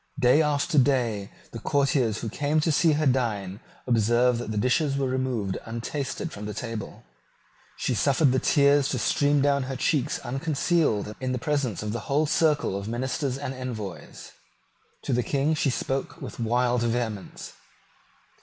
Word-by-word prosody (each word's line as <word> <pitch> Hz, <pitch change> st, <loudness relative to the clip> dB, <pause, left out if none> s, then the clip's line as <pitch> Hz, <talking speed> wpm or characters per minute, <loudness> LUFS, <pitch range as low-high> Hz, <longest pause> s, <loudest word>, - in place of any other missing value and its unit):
Day 130 Hz, +3 st, +5 dB
after 150 Hz, +1 st, +2 dB
day 120 Hz, -7 st, +1 dB, 0.2 s
the -, -, -7 dB
courtiers 135 Hz, -6 st, +1 dB
who 115 Hz, -, -3 dB
came 145 Hz, +6 st, 0 dB
to 160 Hz, -, +1 dB
see 155 Hz, +2 st, +3 dB
her 155 Hz, +1 st, 0 dB
dine 110 Hz, -7 st, 0 dB, 0.3 s
observed 120 Hz, +1 st, +3 dB
that 120 Hz, -, -5 dB
the 110 Hz, -, -3 dB
dishes 135 Hz, +5 st, +1 dB
were 140 Hz, -, 0 dB
removed 130 Hz, -7 st, -2 dB
untasted 130 Hz, +7 st, -4 dB
from 105 Hz, -4 st, -7 dB
the 105 Hz, -, -5 dB
table. 115 Hz, -4 st, -6 dB, 0.7 s
She 130 Hz, -, -1 dB
suffered 140 Hz, +4 st, +3 dB
the 130 Hz, -, +2 dB
tears 140 Hz, 0 st, +3 dB
to -, -, -1 dB
stream 145 Hz, -1 st, +2 dB
down 140 Hz, -1 st, +3 dB
her 135 Hz, -, -3 dB
cheeks 145 Hz, +1 st, 0 dB
unconcealed 135 Hz, -, 0 dB
in 130 Hz, -1 st, -2 dB
the -, -, -1 dB
presence 130 Hz, -, -1 dB
of 105 Hz, 0 st, -3 dB
the 120 Hz, -, -2 dB
whole 145 Hz, +3 st, +2 dB
circle 150 Hz, -8 st, +1 dB
of 100 Hz, +1 st, -4 dB
ministers 130 Hz, +3 st, -2 dB
and 135 Hz, -1 st, -4 dB
envoys. 115 Hz, -8 st, -7 dB, 0.7 s
To 135 Hz, -, -1 dB
the 125 Hz, -, +2 dB
King 140 Hz, +5 st, 0 dB
she 155 Hz, -2 st, +1 dB
spoke 135 Hz, +4 st, -3 dB
with 135 Hz, -5 st, -8 dB
wild 120 Hz, +1 st, +1 dB
vehemence. 115 Hz, -4 st, -3 dB
130 Hz, 165 wpm, -26 LUFS, 115-145 Hz, 0.7 s, Day